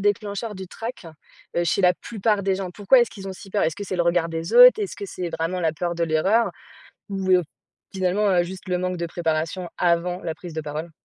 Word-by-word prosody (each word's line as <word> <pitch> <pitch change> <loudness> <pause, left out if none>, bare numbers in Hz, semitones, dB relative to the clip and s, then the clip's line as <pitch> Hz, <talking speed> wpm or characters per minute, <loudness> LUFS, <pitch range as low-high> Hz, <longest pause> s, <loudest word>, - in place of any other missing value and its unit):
déclencheur 205 +1 -1
du 190 -1 -7
trac, 225 0 -7 0.5
heu, 175 - +2
chez 170 - +1
la 180 -1 +5
plupart 210 0 -1
des 195 0 +1
gens? 190 -2 -4
Pourquoi 205 +7 +4
est-ce 240 - +1
qu'ils 195 -1 -8
ont - - -4
si 195 +1 -12
peur? 205 - +1
Est-ce 160 0 0
que 205 - -5
c'est 190 - -4
le 175 - +2
regard 170 -1 +2
des 165 +1 -4
autres? - - +9
Est-ce 400 - -5
que 200 - -6
c'est 180 -2 -5
vraiment 165 +3 -2
la 160 -2 +1
peur 175 +2 -2
de 170 - -2
l'erreur 190 +9 +2 0.6
ou, 195 -2 -2
heu, 180 -1 +5 0.5
finalement, 190 +2 +1
heu, 180 -2 +4
juste 185 +2 -8
le 180 - +1
manque 185 0 -2
de 170 - -2
préparation 165 +2 -2
avant 175 +1 +1
la 165 -2 -3
prise 175 0 -10
de 160 - -2
parole? 155 +2 -5
180 Hz, 240 wpm, -23 LUFS, 170-200 Hz, 0.6 s, autres